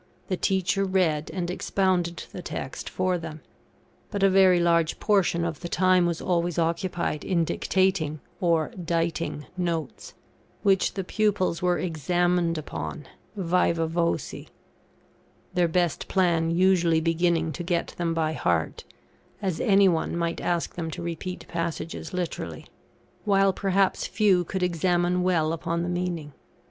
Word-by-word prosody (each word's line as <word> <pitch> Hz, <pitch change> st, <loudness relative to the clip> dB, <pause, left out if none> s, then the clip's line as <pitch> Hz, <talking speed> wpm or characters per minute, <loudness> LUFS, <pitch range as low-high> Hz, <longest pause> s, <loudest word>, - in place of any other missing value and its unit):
The 185 Hz, -, +1 dB
teacher 195 Hz, +1 st, +1 dB
read 180 Hz, -6 st, +1 dB
and 180 Hz, -2 st, -3 dB
expounded 180 Hz, -2 st, 0 dB
the 180 Hz, -, -7 dB
text 135 Hz, -, -5 dB
for 185 Hz, -1 st, 0 dB
them; 160 Hz, -2 st, -8 dB, 0.7 s
but 200 Hz, -2 st, -2 dB
a 195 Hz, -, +5 dB
very 185 Hz, -2 st, +6 dB
large 170 Hz, -1 st, +2 dB
portion 190 Hz, -5 st, +2 dB
of 165 Hz, -3 st, -3 dB
the 175 Hz, -, -6 dB
time 185 Hz, 0 st, +3 dB
was 170 Hz, -1 st, -2 dB
always 175 Hz, -1 st, 0 dB
occupied 170 Hz, -2 st, -1 dB
in 170 Hz, -3 st, +1 dB
dictating, 185 Hz, -5 st, 0 dB, 0.2 s
or 165 Hz, -3 st, +2 dB
"diting," 165 Hz, -2 st, -1 dB
notes, 170 Hz, -6 st, -3 dB, 0.5 s
which 195 Hz, -2 st, +3 dB
the 195 Hz, -, -2 dB
pupils 200 Hz, -3 st, 0 dB
were 180 Hz, 0 st, +2 dB
examined 175 Hz, +1 st, 0 dB
upon, 150 Hz, -1 st, -5 dB, 0.3 s
vivâ 170 Hz, -2 st, +1 dB
voce; 170 Hz, +1 st, -2 dB, 1.1 s
their 180 Hz, -1 st, +3 dB
best 175 Hz, -1 st, 0 dB
plan 170 Hz, -4 st, +2 dB
usually 170 Hz, -2 st, +3 dB
being 165 Hz, 0 st, +1 dB
to 155 Hz, -, -6 dB
get 175 Hz, 0 st, -1 dB
them 165 Hz, -1 st, 0 dB
by 160 Hz, -1 st, 0 dB
heart, 85 Hz, -, -1 dB, 0.5 s
as 190 Hz, -5 st, -2 dB
any 200 Hz, -3 st, +5 dB
one 170 Hz, -1 st, 0 dB
might 170 Hz, 0 st, -2 dB
ask 175 Hz, -1 st, -1 dB
them 165 Hz, -2 st, -4 dB
to 175 Hz, +2 st, -6 dB
repeat 170 Hz, +2 st, -5 dB
passages 165 Hz, -1 st, -4 dB
literally; 180 Hz, -2 st, -4 dB, 0.6 s
while 195 Hz, -2 st, +3 dB
perhaps 195 Hz, 0 st, +1 dB
few 195 Hz, -5 st, +3 dB
could 190 Hz, +2 st, -3 dB
examine 175 Hz, +1 st, +1 dB
well 165 Hz, -3 st, +2 dB
upon 170 Hz, +1 st, -2 dB
the 175 Hz, -, -2 dB
meaning. 175 Hz, -4 st, -3 dB
175 Hz, 140 wpm, -26 LUFS, 165-185 Hz, 1.1 s, very